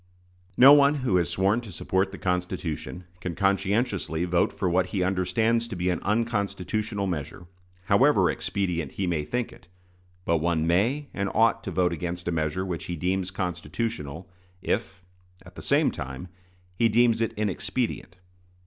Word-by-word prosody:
No 135 Hz, +3 st, +10 dB
one 145 Hz, 0 st, +6 dB
who 95 Hz, -7 st, +3 dB
has 85 Hz, -4 st, +1 dB
sworn 100 Hz, +5 st, +1 dB
to 110 Hz, -4 st, -10 dB
support 95 Hz, +3 st, -1 dB
the 100 Hz, -, -8 dB
Constitution 90 Hz, -1 st, -3 dB, 0.2 s
can 90 Hz, -2 st, -4 dB
conscientiously 100 Hz, -3 st, 0 dB
vote 85 Hz, -1 st, +2 dB
for 95 Hz, -, -2 dB
what 90 Hz, +1 st, +2 dB
he 95 Hz, -1 st, -1 dB
understands 110 Hz, +6 st, +1 dB
to 115 Hz, -, -6 dB
be 90 Hz, +1 st, 0 dB
an 90 Hz, -, -2 dB
unconstitutional 105 Hz, -1 st, -1 dB
measure, 85 Hz, -1 st, -4 dB, 0.4 s
however -, -, +4 dB
expedient 85 Hz, -7 st, -2 dB
he 100 Hz, -, -2 dB
may 85 Hz, -4 st, 0 dB
think 120 Hz, +10 st, -3 dB
it; -, -, -18 dB, 0.6 s
but 85 Hz, -, +2 dB
one 80 Hz, 0 st, 0 dB
may 115 Hz, -, +1 dB
and 100 Hz, 0 st, -1 dB
ought 115 Hz, +1 st, +3 dB
to -, -, -3 dB
vote 90 Hz, -2 st, +1 dB
against 85 Hz, +2 st, -4 dB
a -, -, +1 dB
measure 80 Hz, +3 st, -1 dB
which 90 Hz, -3 st, -4 dB
he 90 Hz, -, -4 dB
deems 90 Hz, +2 st, -1 dB
constitutional 90 Hz, -2 st, -4 dB, 0.4 s
if, 95 Hz, -3 st, -2 dB, 0.4 s
at 90 Hz, -, -13 dB
the -, -, -9 dB
same 145 Hz, +2 st, +2 dB
time, 65 Hz, +4 st, -7 dB, 0.4 s
he 115 Hz, +5 st, +2 dB
deems 115 Hz, +1 st, +3 dB
it 115 Hz, -, 0 dB
inexpedient. 100 Hz, -1 st, -2 dB
95 Hz, 160 wpm, -26 LUFS, 85-110 Hz, 0.6 s, No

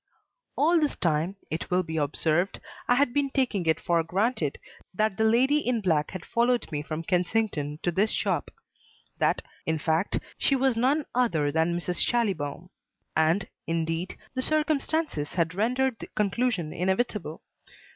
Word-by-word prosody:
All 335 Hz, +3 st, +4 dB
this 300 Hz, -2 st, 0 dB
time, 165 Hz, +3 st, 0 dB, 0.2 s
it 160 Hz, -, -3 dB
will 185 Hz, 0 st, +2 dB
be 160 Hz, -1 st, -4 dB
observed, 155 Hz, +4 st, 0 dB, 0.3 s
I 245 Hz, -, +5 dB
had 255 Hz, -2 st, +2 dB
been 285 Hz, -1 st, +1 dB
taking 245 Hz, -10 st, 0 dB
it 160 Hz, -, +3 dB
for 170 Hz, -1 st, +2 dB
granted 180 Hz, -, 0 dB, 0.4 s
that 215 Hz, 0 st, +1 dB
the 220 Hz, -, +1 dB
lady 255 Hz, +7 st, +4 dB
in 250 Hz, -5 st, 0 dB
black 160 Hz, -7 st, +1 dB
had 185 Hz, -3 st, -7 dB
followed 240 Hz, -2 st, +1 dB
me 145 Hz, -1 st, -2 dB
from 155 Hz, +2 st, -4 dB
Kensington 175 Hz, -4 st, 0 dB
to 175 Hz, -, +1 dB
this 200 Hz, +6 st, +2 dB
shop; -, -, -1 dB, 0.7 s
that, -, -, +2 dB, 0.2 s
in 160 Hz, 0 st, +1 dB
fact, 160 Hz, +4 st, +1 dB, 0.2 s
she 275 Hz, -, +3 dB
was 265 Hz, -2 st, +2 dB
none 270 Hz, +6 st, +2 dB
other 165 Hz, -13 st, +2 dB
than 165 Hz, +3 st, +1 dB
Mrs. 175 Hz, +1 st, -2 dB
Schallibaum. 180 Hz, -8 st, 0 dB, 0.4 s
And, 160 Hz, +5 st, +2 dB, 0.2 s
indeed, 165 Hz, +2 st, -2 dB, 0.2 s
the 255 Hz, -, -1 dB
circumstances 310 Hz, -, 0 dB
had 170 Hz, -1 st, +1 dB
rendered 250 Hz, +5 st, 0 dB
the -, -, -7 dB
conclusion 200 Hz, -5 st, 0 dB
inevitable. 190 Hz, -2 st, -1 dB
190 Hz, 155 wpm, -27 LUFS, 160-245 Hz, 0.7 s, I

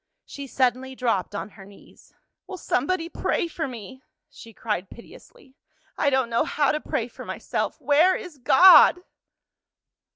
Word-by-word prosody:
'" -, -, -57 dB
She 280 Hz, -1 st, -9 dB
suddenly 260 Hz, 0 st, -1 dB
dropped 225 Hz, -6 st, -2 dB
on 200 Hz, -, -5 dB
her 200 Hz, -1 st, -15 dB
knees. 200 Hz, +1 st, -19 dB, 0.4 s
"Will 380 Hz, -1 st, -8 dB
somebody 330 Hz, +3 st, -2 dB
pray 340 Hz, -, -2 dB
for 325 Hz, -2 st, -5 dB
me?" 255 Hz, +1 st, -10 dB, 0.3 s
she 230 Hz, -, -14 dB
cried 210 Hz, -4 st, -4 dB
piteously. 270 Hz, -, -17 dB, 0.4 s
"I 285 Hz, -, +1 dB
don't 260 Hz, -3 st, 0 dB
know 230 Hz, -, +1 dB
how 290 Hz, -2 st, 0 dB
to 305 Hz, -, -2 dB
pray 230 Hz, -, -3 dB
for 240 Hz, -, -12 dB
myself. -, -, -4 dB
Where 300 Hz, +6 st, +3 dB
is 330 Hz, -6 st, -9 dB
God?" 355 Hz, +7 st, +6 dB
265 Hz, 155 wpm, -23 LUFS, 230-315 Hz, 0.4 s, God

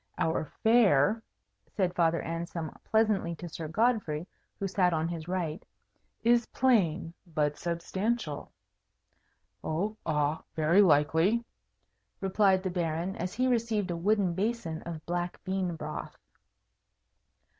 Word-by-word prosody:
"Our 160 Hz, -1 st, 0 dB, 0.2 s
fare," 220 Hz, -, +5 dB, 0.5 s
said 185 Hz, -3 st, -1 dB
Father 170 Hz, -2 st, +2 dB
Anselm 165 Hz, -1 st, -4 dB
pleasantly 215 Hz, -6 st, +1 dB
to 175 Hz, -, -7 dB
Sir 160 Hz, -1 st, -6 dB
Godfrey, 175 Hz, -5 st, +1 dB, 0.3 s
who 195 Hz, -, -2 dB
sat 180 Hz, -2 st, +2 dB
on 160 Hz, 0 st, 0 dB
his 165 Hz, -1 st, -5 dB
right, 175 Hz, -3 st, -2 dB, 0.6 s
"is 235 Hz, 0 st, +4 dB
plain, 185 Hz, -10 st, +2 dB
but 150 Hz, -3 st, 0 dB
substantial." 175 Hz, +1 st, -2 dB, 1.1 s
"Oh 195 Hz, +8 st, -1 dB
ah, 150 Hz, -1 st, 0 dB
very 160 Hz, +5 st, +5 dB
likely," 165 Hz, +7 st, +3 dB, 0.7 s
replied 195 Hz, -1 st, +3 dB
the 185 Hz, -, -1 dB
Baron, 170 Hz, +1 st, -1 dB
as 180 Hz, +2 st, -4 dB
he 255 Hz, +3 st, +1 dB
received 225 Hz, -6 st, +1 dB
a -, -, -1 dB
wooden 195 Hz, +1 st, +2 dB
basin 190 Hz, -4 st, -2 dB
of 160 Hz, -2 st, -6 dB
black 175 Hz, 0 st, -2 dB
bean 185 Hz, -2 st, -1 dB
broth. -, -, -6 dB
175 Hz, 120 wpm, -29 LUFS, 160-210 Hz, 1.1 s, fare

